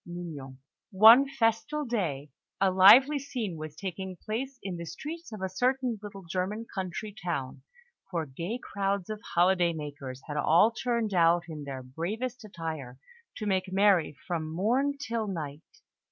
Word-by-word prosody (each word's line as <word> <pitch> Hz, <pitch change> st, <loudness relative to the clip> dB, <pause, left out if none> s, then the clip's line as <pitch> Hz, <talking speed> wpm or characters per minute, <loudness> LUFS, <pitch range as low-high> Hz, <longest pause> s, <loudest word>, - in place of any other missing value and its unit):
MIGNON 160 Hz, -7 st, -8 dB, 0.3 s
One 225 Hz, +7 st, +8 dB
festal 240 Hz, +5 st, 0 dB
day, 160 Hz, -, -2 dB, 0.3 s
a 195 Hz, -1 st, +3 dB
lively 245 Hz, +11 st, +7 dB
scene 245 Hz, -9 st, -4 dB
was 155 Hz, -1 st, -7 dB
taking 190 Hz, +1 st, -5 dB
place 250 Hz, +9 st, -4 dB
in 185 Hz, -3 st, -4 dB
the 170 Hz, -, -6 dB
streets 330 Hz, -, -7 dB
of 210 Hz, -3 st, -7 dB
a -, -, +1 dB
certain 250 Hz, +3 st, 0 dB
little 200 Hz, -2 st, -9 dB
German 185 Hz, +6 st, -3 dB
country 190 Hz, +1 st, -4 dB
town; 140 Hz, -7 st, -3 dB, 0.5 s
for 170 Hz, -4 st, -2 dB
gay 170 Hz, -, -4 dB
crowds 200 Hz, -4 st, -2 dB
of 215 Hz, -1 st, -6 dB
holiday 175 Hz, -1 st, +4 dB
makers 140 Hz, -4 st, -7 dB
had 150 Hz, -1 st, -5 dB
all 170 Hz, +9 st, +5 dB
turned 235 Hz, -3 st, -1 dB
out 170 Hz, -1 st, +4 dB
in 155 Hz, -3 st, -7 dB
their 135 Hz, -2 st, -6 dB
bravest 215 Hz, -, -4 dB
attire 160 Hz, -10 st, -6 dB, 0.4 s
to 215 Hz, -, -4 dB
make 190 Hz, -2 st, 0 dB
merry 190 Hz, -6 st, +3 dB
from 160 Hz, -3 st, -3 dB
morn 250 Hz, -, +1 dB
till 230 Hz, -6 st, -3 dB
night. 155 Hz, -6 st, -5 dB
190 Hz, 155 wpm, -29 LUFS, 165-225 Hz, 0.5 s, One